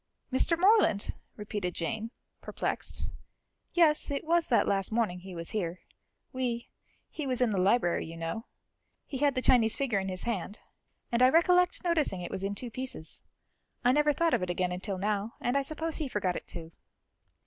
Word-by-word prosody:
"Mr. 330 +5 +3
Morland!" 380 - +4 0.2
repeated 205 -4 -4
Jane, 220 +6 -3 0.3
perplexed. - - -3 0.6
"Yes, 320 -3 +4
it 280 -1 -2
was 335 +1 +2
that 240 - +3
last 195 0 +1
morning 220 -6 0
he 185 0 -9
was 165 0 -5
here. 180 -4 -2 0.5
We 245 -2 -2 0.4
he 300 -3 -5
was 255 -2 -1
in 245 -3 +3
the 195 - 0
library, 185 -3 +2
you 165 +1 -8
know. 165 +9 -4 0.6
He 270 - -5
had 285 -1 +3
the 255 - -1
Chinese 230 -3 +4
figure 245 -8 0
in 190 0 -3
his 185 -1 -3
hand, 210 -2 -3 0.5
and 235 +1 +2
I 255 - +8
recollect 360 +5 +4
noticing 315 - +1
it 175 - -5
was 195 0 -4
in 200 +1 -1
two 240 +2 -5
pieces. 255 -9 -5 0.6
I 250 - +6
never 295 +2 +4
thought 330 +3 +1
of - - +2
it 180 - -2
again 180 0 0
until 185 +2 -3
now, 205 +2 -1
and 245 +2 0
I 280 - +4
suppose 315 +3 -3
he 310 - -2
forgot 195 -7 -1
it - - -6
too." 165 -1 -8
230 Hz, 185 wpm, -30 LUFS, 190-280 Hz, 0.6 s, I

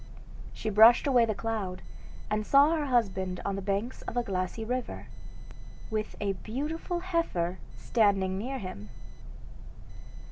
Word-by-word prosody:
She 215 - -4
brushed 220 +4 +7
away 250 -4 +4
the 215 -2 -2
cloud, 205 -5 -3 0.4
and 215 0 -1
saw 280 +7 +5
her 305 -3 -1
husband 190 -7 0
on 200 - -1
the 195 - -4
banks 200 +5 -2
of 245 - -4
a 245 - +2
glassy 190 +2 -3
river, 250 +2 -4 0.9
with 215 -1 -3
a 200 -1 0
beautiful 300 - -4
heifer 260 - -1 0.2
standing 195 -4 +2
near 250 +8 -3
him. 185 - -7
215 Hz, 135 wpm, -29 LUFS, 195-250 Hz, 0.9 s, brushed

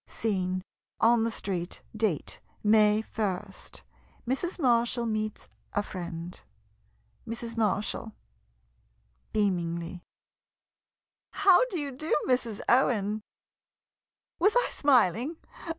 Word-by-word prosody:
Scene 185 -4 -1 0.2
— - - -55
On 235 - +3
the 230 - +1
street. 185 -5 -3
Date 210 -9 -1
— - - -36
May 210 0 +5
ist. 195 -2 -4 0.4
Mrs. 275 +8 -1
Marshall 240 -4 +2
meets 215 -1 -2 0.3
a 205 - +1
friend. 175 -2 -7 0.9
Mrs. 230 0 -4
Marshall 215 0 0 1.2
[Beamingly.] 175 -4 -1 1.3
How 380 0 +5
do 400 -9 -4
you 285 -2 -3
do, 310 +5 -1
Mrs. 240 -5 0
Owen! 215 -4 +3 1.2
Was 410 +6 +4
I - - +3
smiling? 255 - +3
215 Hz, 100 wpm, -28 LUFS, 195-250 Hz, 1.3 s, May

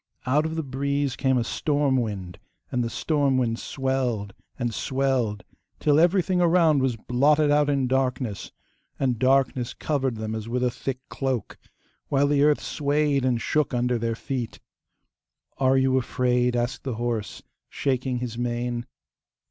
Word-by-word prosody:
Out 150 +5 +2
of 160 - -5
the 160 - -2
breeze 140 0 -1
came 130 -2 +1
a 120 - +1
storm 145 +2 0
wind, 100 -8 -3 0.3
and 125 -1 0
the 115 - -2
storm 140 -1 +1
wind 115 -3 0
swelled 125 -7 -2 0.2
and 120 -3 -2
swelled 130 -5 0 0.4
till 150 0 +3
everything 180 +1 +3
around 165 -4 +4
was 130 -3 +1
blotted 145 +6 +2
out 145 0 +3
in 140 -2 +1
darkness, 125 -5 -1 0.5
and 125 -4 0
darkness 130 -2 +2
covered 135 -5 -1
them 110 0 -4
as 110 0 -5
with 125 +1 -1
a 125 - +2
thick 130 +2 -4
cloak, 130 -4 -3 0.5
while 140 0 +2
the 145 -1 +2
earth 150 0 +4
swayed 145 -1 +1
and 125 -3 +1
shook 150 -2 0
under 120 0 +1
their 115 0 -1
feet. 125 -1 -4 1.0
'Are 135 0 +4
you 130 0 +3
afraid?' 125 0 +1
asked 120 +2 -2
the 130 -4 -3
horse, 115 -3 -3 0.3
shaking 130 -2 -1
his 120 -1 -4
mane. 120 0 -2
130 Hz, 155 wpm, -25 LUFS, 120-140 Hz, 1.0 s, around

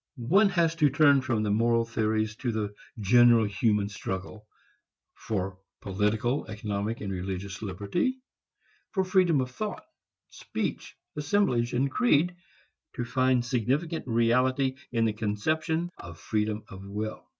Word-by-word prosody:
One 190 - +4
has 170 -3 +2
to 150 -3 +4
turn 140 0 +5
from 120 -4 -1
moral 115 +2 +2
theories 110 -1 -1
to 125 -2 -2
the 105 -2 -3 0.3
general 120 +2 +5
human 105 -1 +1
struggle 100 +1 -6 0.7
for 95 -3 -4 0.2
political, 105 +7 0
economic 105 +1 -3
and 100 -2 -3
religious 95 +1 -5
liberty, 105 - -1 0.8
for 190 - +2
freedom 180 -6 +3
of 125 0 -4
thought, 210 +9 -5 0.5
speech, - - -4 0.2
assemblage 145 -7 +1
and 135 +3 +1
creed, 175 - +2 0.6
to 120 - -2
find 130 0 +2
significant 135 +7 -1
reality 125 +3 +2 0.2
in 115 -2 +1
the 110 - +1
conception 155 +11 -1
of 85 -1 -10
freedom 105 0 -1
of 95 0 -10
will. 105 +2 -5
115 Hz, 130 wpm, -28 LUFS, 105-140 Hz, 0.8 s, turn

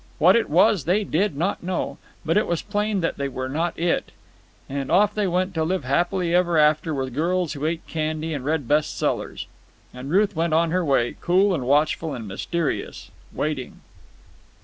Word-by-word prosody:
What 180 +5 +6
it 235 - +1
was 180 +1 +4
they 195 +5 +2
did 195 -3 0
not 175 +6 -1
know, 180 +1 -3 0.3
but 165 +1 +1
it 210 - +2
was 170 -2 -1
plain 210 -1 -1
that 165 - -1
they 140 - -1
were 130 -1 -4
not 160 +6 -2
it, 170 +1 0 0.6
and 135 -1 -4
off 205 +3 +4
they 210 -2 0
went 185 +1 0
to 160 -2 0
live 180 +1 -1
happily 175 +6 0
ever 175 -2 +3
after 155 +1 +3
with 135 -3 -3
girls 170 +4 0
who 150 +1 -2
ate 165 0 -3
candy 155 0 -3
and 140 -4 -4
read 145 -2 -1
best 150 +3 +1
sellers. - - -2 0.5
And 125 +2 -8
Ruth 200 +4 +2
went 165 0 0
on 165 0 +2
her 180 +1 +1
way, 135 -6 +1
cool 190 +3 +3
and 130 -8 -2
watchful 150 +1 +1
and 115 -4 -7
mysterious, 155 - -3 0.2
waiting. 145 -4 -4
165 Hz, 190 wpm, -23 LUFS, 145-185 Hz, 0.6 s, What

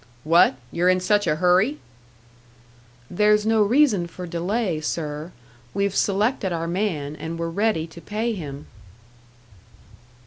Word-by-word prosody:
"What? 165 -2 +5 0.2
You're 175 +2 +2
in 185 0 +3
such 205 +1 +1
a 150 - +2
hurry?" 185 - +3 1.3
"There's 210 +3 +3
no 220 0 +3
reason 210 -5 +3
for 180 +2 -8
delay, 175 0 -2
sir. 155 +1 -4 0.4
We've 200 -1 0
selected 205 0 +1
our 165 -1 -2
man, 170 -6 -2
and 165 +1 -6
we're 165 0 -3
ready 205 -3 0
to 170 +1 -13
pay 220 +5 -2
him." 145 -7 -7
180 Hz, 130 wpm, -23 LUFS, 165-210 Hz, 1.3 s, What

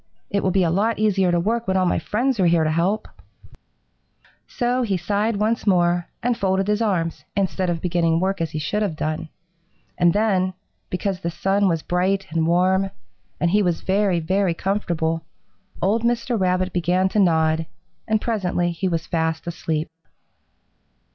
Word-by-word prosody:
It 200 - +1
will 190 - +1
be 190 0 +2
a 165 - +1
lot 215 +6 +1
easier 195 -4 +2
to 175 - +2
work 225 +5 -1
when 190 0 +1
all 185 - +2
my 175 - +1
friends 235 - -1
are 180 - +4
here 165 -1 +3
to 155 - +1
help,' 185 +7 0 1.4
So 245 +1 0
he 205 -6 0
sighed 205 +5 0
once 220 +2 0
more 175 -2 +2 0.2
and 245 0 +1
folded 190 -2 0
his 210 +1 +1
arms, 175 -7 -1
instead 185 -2 0
of 170 -2 -2
beginning 165 -2 +1
work 190 0 -1
as 165 - -1
he 155 - -5
should 155 +8 -1
have 200 -7 -1
done. 155 +1 -3 0.7
And 175 -1 +5
then, 185 -2 +1 0.3
because 185 +1 -2
the 170 - -3
sun 195 +4 +1
was 165 -3 0
bright 190 +2 0
and 160 0 +1
warm, 185 +3 +2 0.5
and 170 - +1
he 210 +2 +4
was 175 -4 0
very, 195 -2 +1
very 185 +1 0
comfortable, 165 -4 -1 0.6
old 210 +5 +2
Mr. 235 +1 0
Rabbit 185 0 +1
began 180 +2 +2
to 210 - 0
nod, 160 -3 +2 0.4
and 220 -1 +2
presently 180 -6 -1
he 170 +3 -2
was 165 -2 -1
fast 160 -1 -1
asleep. 160 -2 -2
185 Hz, 175 wpm, -22 LUFS, 170-205 Hz, 1.4 s, And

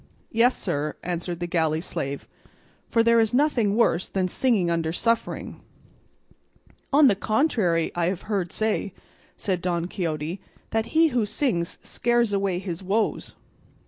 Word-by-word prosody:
"Yes, 235 +3 +3
sir," 150 -4 -2
answered 175 0 -3
the 175 - -2
galley 160 -2 +1
slave, 140 -4 -4 0.6
"for 230 - +3
there 230 0 +5
is 225 +1 +2
nothing 250 -8 +2
worse 200 -6 +2
than 185 -1 -1
singing 195 -4 +1
under 165 -1 0
suffering." 230 +6 -1 1.3
"On 295 +1 +6
the 245 - +5
contrary, 210 - +1
I 170 -1 0
have 185 -1 -2
heard 195 -5 -2
say," 215 -3 -1 0.4
said 185 -3 -2
Don 175 -1 -1
Quixote, 170 -1 -3 0.3
"that 225 0 0
he 325 0 +6
who 245 -5 +1
sings 200 - -1
scares 240 -2 +1
away 195 -2 0
his 180 -2 -5
woes." 205 +4 -1
195 Hz, 145 wpm, -25 LUFS, 170-230 Hz, 1.3 s, On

